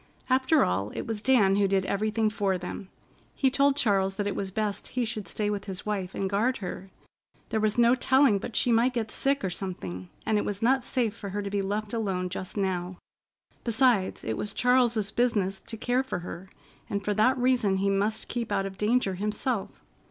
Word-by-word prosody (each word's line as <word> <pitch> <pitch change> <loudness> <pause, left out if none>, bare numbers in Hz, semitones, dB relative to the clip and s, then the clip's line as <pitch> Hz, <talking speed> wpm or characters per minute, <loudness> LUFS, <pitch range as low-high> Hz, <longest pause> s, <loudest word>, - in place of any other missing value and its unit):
After 260 +4 +4
all, 95 +3 -1
it - - -4
was 220 -2 -4
Dan 210 -6 +4
who 200 -1 +3
did 190 -1 +1
everything 215 +2 0
for 195 -3 0
them. 180 +1 -7 0.5
He 265 -2 +2
told 280 +1 +3
Charles 195 -7 +2
that 205 - -2
it 200 - -2
was 195 - -2
best 210 +1 -3
he 245 - +2
should 215 -4 -5
stay 210 +4 -2
with 200 -1 -3
his 190 -2 -6
wife 195 -3 -3
and 195 - -1
guard 220 +7 +1
her. 190 0 -6 0.6
There 220 - 0
was 215 0 +1
no 235 0 +5
telling 260 -4 +4
but 210 - -7
she 245 - +2
might 240 +3 +3
get 220 -2 -2
sick 275 0 +1
or 190 - -1
something, 95 - -5 0.2
and 215 -1 +2
it - - -1
was 205 -1 -3
not 260 +3 +2
safe 235 -4 0
for 205 -3 -7
her 205 +2 -3
to 200 - -4
be 200 -1 0
left 205 +2 -3
alone 190 -5 -1
just 185 +2 -6
now. 185 -2 -2 0.7
Besides, 235 -4 +2
it 110 - -2
was 210 - -3
Charles's 240 -5 +2
business 205 -6 +1
to 225 - -8
care 245 +3 +1
for 265 -8 -4
her, 185 +2 -8 0.4
and 200 -1 -3
for 210 - +1
that 235 +6 +3
reason 245 -6 +2
he 200 +1 +1
must 205 +2 0
keep 235 -2 -4
out 195 - +1
of 195 -1 -7
danger 210 -2 +2
himself. 210 +3 -3
210 Hz, 210 wpm, -27 LUFS, 195-240 Hz, 0.7 s, no